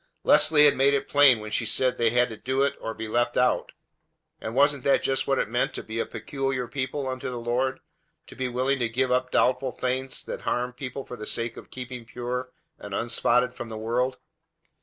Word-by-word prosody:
Leslie 150 -1 +6
had 145 - +5
made 140 +1 +4
it 140 - -2
plain 145 -5 +6
when 105 0 -7
she 120 - 0
said 125 +3 +1
they 115 -1 +4
had 125 +2 +3
to 110 - -8
do 130 +4 0
it 140 - +1
or 115 - -5
be 110 - -5
left 120 +2 0
out. 125 - +2 0.7
And 110 +2 -5
wasn't 140 -1 +3
that 140 - +3
just 135 0 0
what 135 - +2
it - - 0
meant 120 +3 -1
to - - -5
be 110 +1 -5
a - - -1
"peculiar 135 -3 -3
people" 135 +1 -3
unto 130 0 -4
the 125 - -5
Lord, 125 +3 -1 0.4
to - - -13
be 130 -1 -2
willing 130 +3 0
to 120 -2 0
give 130 +2 0
up 125 0 +1
doubtful 130 +1 +2
things 130 +2 -2
that - - -6
harmed 125 0 -2
people 135 +1 -6
for 125 - -8
the 105 -1 -7
sake 115 0 -2
of - - -11
keeping 125 -2 -7
pure 125 +2 -4 0.3
and 100 -1 -6
unspotted 120 +2 +1
from 120 - -7
the 110 - -6
world? 125 +4 -1
125 Hz, 220 wpm, -26 LUFS, 120-135 Hz, 0.7 s, Leslie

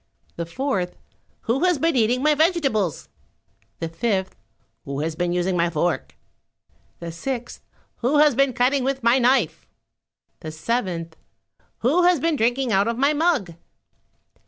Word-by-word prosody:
The 170 -1 -4
fourth, 190 -4 -2 0.4
"Who 250 +7 -1
has 360 -3 +3
been 325 +2 +1
eating 245 +2 +2
my 305 0 +4
vegetables?" 285 - 0 0.7
The 165 - -4
fifth, 190 +3 -2 0.5
"Who 140 +1 -4
has 160 +1 -2
been 175 +1 -1
using 180 +1 0
my 170 0 +2
fork?" 170 +1 -2 0.8
The 170 -1 -7
sixth, 240 +8 -5 0.4
"Who 260 +5 +1
has 300 -1 +5
been 275 +1 +2
cutting 255 +3 +2
with 270 -1 -2
my 235 +3 +4
knife?" 255 +2 +1 0.7
The 155 - -7
seventh, 165 -2 -3 0.6
"Who 285 +10 +3
has 355 -2 +4
been 325 +3 +1
drinking 245 +1 0
out 200 +1 +3
of 230 0 -1
my 280 +3 +3
mug?" 300 - +1
240 Hz, 145 wpm, -23 LUFS, 175-275 Hz, 0.8 s, has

